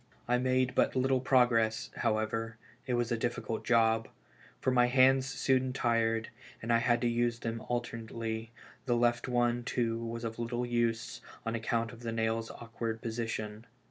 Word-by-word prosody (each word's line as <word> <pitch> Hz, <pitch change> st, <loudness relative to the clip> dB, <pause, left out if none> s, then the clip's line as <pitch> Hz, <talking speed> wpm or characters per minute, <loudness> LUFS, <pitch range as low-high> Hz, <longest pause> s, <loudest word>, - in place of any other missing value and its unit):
I 125 Hz, +1 st, +2 dB
made 130 Hz, 0 st, +1 dB
but -, -, +2 dB
little 130 Hz, 0 st, +2 dB
progress, 120 Hz, -4 st, +2 dB
however, 115 Hz, 0 st, -1 dB, 0.3 s
it 125 Hz, -, +1 dB
was 120 Hz, 0 st, 0 dB
a 120 Hz, -, +1 dB
difficult 115 Hz, -1 st, -2 dB
job; 115 Hz, -1 st, +3 dB, 0.5 s
for 130 Hz, -, +1 dB
my 125 Hz, -1 st, +4 dB
hands 130 Hz, +1 st, +4 dB
soon 130 Hz, -1 st, +1 dB
tired, 115 Hz, -2 st, +1 dB, 0.3 s
and 115 Hz, +1 st, -1 dB
I 115 Hz, -, +5 dB
had 120 Hz, 0 st, +2 dB
to 120 Hz, -, +2 dB
use 120 Hz, 0 st, +1 dB
them 115 Hz, -1 st, -4 dB
alternately, 115 Hz, -2 st, -3 dB, 0.4 s
the 120 Hz, -, +3 dB
left 120 Hz, 0 st, +2 dB
one, 120 Hz, -1 st, +1 dB
too, 115 Hz, -1 st, -1 dB
was 115 Hz, 0 st, -5 dB
of 115 Hz, 0 st, -4 dB
little 120 Hz, +1 st, -2 dB
use, 120 Hz, -1 st, -1 dB, 0.2 s
on 115 Hz, -, -1 dB
account 115 Hz, 0 st, -1 dB
of 120 Hz, -, -12 dB
the 115 Hz, -1 st, -4 dB
nail's 115 Hz, 0 st, -1 dB
awkward 115 Hz, -1 st, -5 dB
position. 115 Hz, -1 st, -4 dB
115 Hz, 165 wpm, -31 LUFS, 115-120 Hz, 0.5 s, I